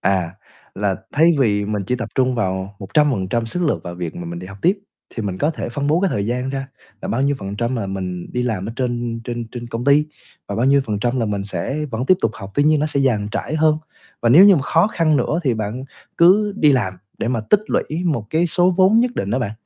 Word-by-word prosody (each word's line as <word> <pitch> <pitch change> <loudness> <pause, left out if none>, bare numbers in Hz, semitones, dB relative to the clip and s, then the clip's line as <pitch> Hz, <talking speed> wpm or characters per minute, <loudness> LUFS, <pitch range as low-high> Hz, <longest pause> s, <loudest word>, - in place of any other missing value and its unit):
À, 95 -2 0 0.4
là 100 -2 -1 0.2
thay 165 +3 +5
vì 105 -4 +2
mình 105 -1 -2
chỉ 125 - 0
tập 120 - -5
trung 130 -1 +2
vào 95 -2 -2
100% 115 -1 0
sức 180 +10 -3
lực 150 - 0
vào 85 - -6
việc 85 -2 -5
mà 85 - -6
mình 85 0 -6
đi 90 - -8
học 95 +1 -11
tiếp, 190 +4 +3 0.4
thì 115 - -3
mình 95 -3 -3
có 150 - +1
thể 155 - -5
phân 140 +4 -3
bố 155 +4 +2
cái 195 - +2
thời 100 0 -1
gian 125 +2 -2
ra 135 0 -4 0.3
là - - -4
bao 125 +4 0
nhiêu 140 0 +1
phần 100 +1 -6
trăm 120 +2 -1
là 110 - -2
mình 95 -2 -4
đi 125 - -1
làm 110 -6 -2
ở - - -5
trên 120 -2 -2
trên 120 -2 -4
trên 120 -1 -6
công 115 +2 -4
ty 145 +2 +4 0.4
và 100 - -3
bao 120 - +1
nhiêu 140 +1 +5
phần 105 -2 -2
trăm 125 +2 0
là 115 - 0
mình 100 -1 -2
sẽ 140 +8 -3
vẫn 120 +3 -3
tiếp 185 - +6
tục 115 - +2
học, 100 -1 -9
tuy 145 - +3
nhiên 155 0 +3
nó 150 - +1
sẽ 145 -2 -1
dàn 110 -7 +1
trải 145 +6 -2
hơn. 155 -1 +3 0.4
Và 120 - +3
nếu 155 +11 +8
như 195 -4 +7
mà 140 - 0
khó 165 +6 +3
khăn 165 -7 +2
nữa 155 - 0
thì 125 -4 +2
bạn 110 +4 -4 0.3
cứ 205 +5 +5
đi 150 -6 +4
làm 100 -8 0 0.2
để - - -2
mà 120 -3 0
tích 210 - +6
lũy 165 +4 -2
một 140 -11 -1
cái 165 +2 +2
số 180 +2 +3
vốn 190 +3 +5
nhất 245 0 0
định 100 - -2
đó 120 - +1
bạn. 120 -6 -2
120 Hz, 265 wpm, -20 LUFS, 105-150 Hz, 0.4 s, nếu